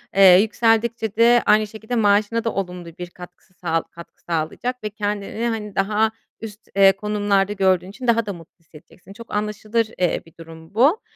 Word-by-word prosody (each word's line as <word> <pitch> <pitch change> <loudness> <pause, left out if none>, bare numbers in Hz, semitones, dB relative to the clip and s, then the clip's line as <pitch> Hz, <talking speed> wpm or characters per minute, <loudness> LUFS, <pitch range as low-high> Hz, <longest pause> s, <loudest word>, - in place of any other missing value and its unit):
Eee, 190 -1 +8
yükseldikçe 225 0 0
de 235 +1 +5
aynı 215 0 +4
şekilde 220 +3 -6
maaşına 215 +1 +2
da 230 - -2
olumlu 180 -2 -4
bir 175 -1 -7
katkısı 180 +1 -15
sağ 165 -2 -2
katkı 170 0 -14
sağlayacak 175 +10 -3
ve 210 - -2
kendini 210 +2 -4
hani 215 -3 -4
daha 215 +3 +1 0.3
üst, 220 0 -10
eee, 195 -1 +7
konumlarda 205 0 0
gördüğün 190 -2 +1
için 250 +5 -8
daha 230 -1 +3
da 200 - -4
mutlu 170 0 -15
hissedeceksin. 165 +4 -17
Çok 230 +1 -12
anlaşılır, 215 +2 -1
eee, 180 -2 +1
bir 165 - -19
durum 160 +2 -13
bu. 280 - +3
205 Hz, 170 wpm, -21 LUFS, 180-225 Hz, 0.3 s, Eee